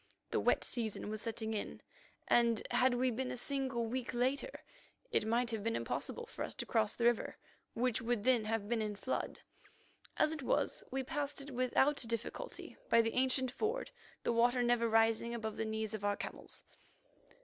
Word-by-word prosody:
The -, -, +2 dB
wet -, -, +3 dB
season 220 Hz, -3 st, -2 dB
was 215 Hz, -1 st, -3 dB
setting 225 Hz, -1 st, -3 dB
in, 210 Hz, -, -4 dB, 0.5 s
and, 235 Hz, -2 st, +3 dB
had 255 Hz, -1 st, +4 dB
we 255 Hz, +1 st, +2 dB
been 255 Hz, +2 st, -2 dB
a -, -, -4 dB
single 260 Hz, -2 st, -1 dB
week 245 Hz, +1 st, -3 dB
later, 260 Hz, -, +1 dB, 0.6 s
it 215 Hz, -, +2 dB
might 235 Hz, +1 st, +2 dB
have 220 Hz, -3 st, -2 dB
been 230 Hz, +1 st, 0 dB
impossible 475 Hz, -, -3 dB
for 465 Hz, -, -10 dB
us -, -, -5 dB
to -, -, -4 dB
cross 220 Hz, -3 st, +1 dB
the 235 Hz, -, -2 dB
river, 240 Hz, -1 st, +2 dB, 0.4 s
which 245 Hz, 0 st, +1 dB
would 230 Hz, -2 st, 0 dB
then 245 Hz, -3 st, +3 dB
have 220 Hz, -1 st, -1 dB
been 230 Hz, 0 st, +1 dB
in 210 Hz, -1 st, -2 dB
flood. 260 Hz, +6 st, -3 dB, 0.8 s
As 310 Hz, -, +4 dB
it 315 Hz, -2 st, -4 dB
was, 255 Hz, -, +1 dB
we 265 Hz, +1 st, -1 dB
passed 290 Hz, +1 st, -1 dB
it 280 Hz, +1 st, -4 dB
without 255 Hz, +3 st, +3 dB
difficulty 235 Hz, -, -4 dB
by 230 Hz, -, +6 dB
the 225 Hz, -, -1 dB
ancient 260 Hz, 0 st, +2 dB
ford, 445 Hz, -, -2 dB, 0.3 s
the -, -, +1 dB
water 245 Hz, +2 st, +4 dB
never 240 Hz, -1 st, +3 dB
rising 225 Hz, +1 st, +3 dB
above 220 Hz, -2 st, -3 dB
the 225 Hz, -, -2 dB
knees 220 Hz, -1 st, -2 dB
of 215 Hz, -2 st, -4 dB
our 205 Hz, 0 st, +1 dB
camels. -, -, -7 dB
235 Hz, 185 wpm, -35 LUFS, 225-260 Hz, 0.8 s, by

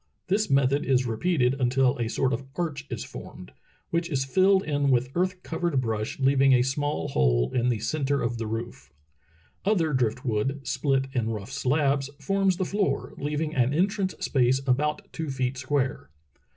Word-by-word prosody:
This 210 Hz, +3 st, +1 dB
method 140 Hz, +1 st, +3 dB
is 130 Hz, -1 st, +2 dB
repeated 125 Hz, +2 st, +1 dB
until 125 Hz, +1 st, +3 dB
a 115 Hz, -2 st, -1 dB
sort 130 Hz, +2 st, 0 dB
of 125 Hz, +3 st, -3 dB
arch 150 Hz, -5 st, -3 dB
is -, -, -4 dB
formed, -, -, -10 dB, 0.4 s
which 170 Hz, +1 st, 0 dB
ie 150 Hz, -, -2 dB
filled 190 Hz, +9 st, +3 dB
in 145 Hz, -2 st, 0 dB
with 125 Hz, 0 st, +2 dB
earth 185 Hz, +1 st, -1 dB
covered 165 Hz, -3 st, -1 dB
brush 110 Hz, -2 st, -2 dB
leaving 135 Hz, 0 st, +4 dB
a 125 Hz, -1 st, +5 dB
small 145 Hz, +2 st, -1 dB
hole -, -, +2 dB
in 125 Hz, 0 st, +2 dB
the 120 Hz, -, +1 dB
centre 140 Hz, +5 st, -1 dB
of 115 Hz, -2 st, -2 dB
the 115 Hz, -, -3 dB
roof. 115 Hz, -, -6 dB, 0.7 s
Other 175 Hz, -7 st, +1 dB
drift 125 Hz, -1 st, 0 dB
wood, 130 Hz, +5 st, -1 dB
split 135 Hz, +1 st, +1 dB
in 115 Hz, -3 st, 0 dB
rough 110 Hz, +1 st, -5 dB
slabs, 140 Hz, 0 st, +1 dB
forms 195 Hz, -2 st, +1 dB
the 185 Hz, -, 0 dB
floor, 200 Hz, +1 st, -1 dB
leaving 150 Hz, +2 st, -2 dB
an 130 Hz, 0 st, +2 dB
entrance 190 Hz, +2 st, 0 dB
space 130 Hz, -1 st, +2 dB
about 150 Hz, +4 st, +1 dB
two 160 Hz, -2 st, -4 dB
feet 130 Hz, -1 st, -1 dB
square. 130 Hz, -, -1 dB
135 Hz, 170 wpm, -26 LUFS, 125-155 Hz, 0.7 s, a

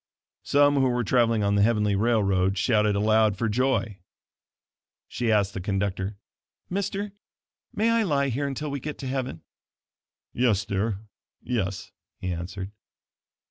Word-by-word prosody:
Some 145 Hz, 0 st, +3 dB
who 135 Hz, -1 st, +3 dB
were 120 Hz, 0 st, 0 dB
traveling 115 Hz, -1 st, +2 dB
on 100 Hz, 0 st, +2 dB
the 100 Hz, -, +3 dB
heavenly 105 Hz, -2 st, +2 dB
railroad 100 Hz, -3 st, +2 dB
shouted 105 Hz, 0 st, +2 dB
aloud 110 Hz, 0 st, +3 dB
for 115 Hz, -, 0 dB
joy. 110 Hz, -3 st, 0 dB, 1.1 s
She 120 Hz, -1 st, -1 dB
asked 105 Hz, -2 st, +2 dB
the 95 Hz, -, -4 dB
conductor: 95 Hz, +1 st, -2 dB, 0.5 s
"Mister, 200 Hz, +1 st, -2 dB, 0.6 s
may 225 Hz, +2 st, +1 dB
I 230 Hz, 0 st, +3 dB
lie 140 Hz, -8 st, +1 dB
here 140 Hz, +4 st, -1 dB
until 140 Hz, +2 st, -4 dB
we 140 Hz, -, -3 dB
get 150 Hz, +3 st, -6 dB
to 135 Hz, -, -6 dB
heaven?" 130 Hz, -9 st, -3 dB, 0.9 s
"Yes, 110 Hz, -5 st, +2 dB
dear, 100 Hz, 0 st, -2 dB, 0.4 s
yes," 100 Hz, -7 st, -3 dB, 0.3 s
he 90 Hz, -1 st, -3 dB
answered. 95 Hz, +3 st, -6 dB
110 Hz, 140 wpm, -26 LUFS, 100-135 Hz, 1.1 s, Some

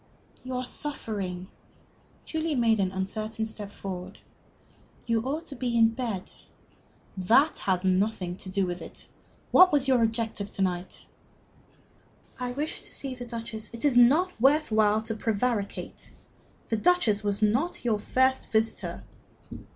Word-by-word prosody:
"You 255 Hz, 0 st, -5 dB
are 250 Hz, 0 st, -2 dB
suffering." 200 Hz, -, -4 dB, 0.8 s
Julie 320 Hz, -1 st, -1 dB
made 230 Hz, -3 st, +3 dB
an 190 Hz, -2 st, +1 dB
uncertain 215 Hz, +4 st, -3 dB
step 210 Hz, -2 st, -6 dB
forward. 185 Hz, -3 st, -7 dB, 0.9 s
"You 230 Hz, -2 st, +1 dB
ought 290 Hz, +7 st, -3 dB
to 285 Hz, -, -7 dB
be 245 Hz, -3 st, -1 dB
in 225 Hz, -1 st, +6 dB
bed." 225 Hz, -5 st, -4 dB, 0.8 s
"That 240 Hz, -, +3 dB
has 185 Hz, -1 st, 0 dB
nothing 190 Hz, -1 st, +1 dB
to 190 Hz, -, -8 dB
do 195 Hz, 0 st, +1 dB
with 175 Hz, 0 st, -4 dB
it. -, -, -10 dB, 0.5 s
What 365 Hz, 0 st, +8 dB
was 285 Hz, -2 st, +2 dB
your 255 Hz, -3 st, +4 dB
object 225 Hz, 0 st, 0 dB
to -, -, -4 dB
night?" 180 Hz, -1 st, -3 dB, 1.4 s
"I 250 Hz, -1 st, -2 dB
wished 295 Hz, +5 st, -3 dB
to -, -, -13 dB
see 270 Hz, -2 st, -6 dB
the 250 Hz, -1 st, -7 dB
Duchess 230 Hz, -2 st, -6 dB
" -, -, -24 dB
"It 230 Hz, -, -3 dB
is 280 Hz, -4 st, +3 dB
not 295 Hz, +10 st, +5 dB
worth 295 Hz, +2 st, +4 dB
while 215 Hz, 0 st, +3 dB
to 225 Hz, -, -3 dB
prevaricate. 220 Hz, -1 st, -2 dB, 0.6 s
The 225 Hz, -, +1 dB
Duchess 220 Hz, -, +3 dB
was 205 Hz, +1 st, -1 dB
not 245 Hz, +8 st, +1 dB
your 220 Hz, -3 st, +2 dB
first 260 Hz, +4 st, +1 dB
visitor." 220 Hz, 0 st, -1 dB
225 Hz, 150 wpm, -27 LUFS, 205-260 Hz, 1.4 s, What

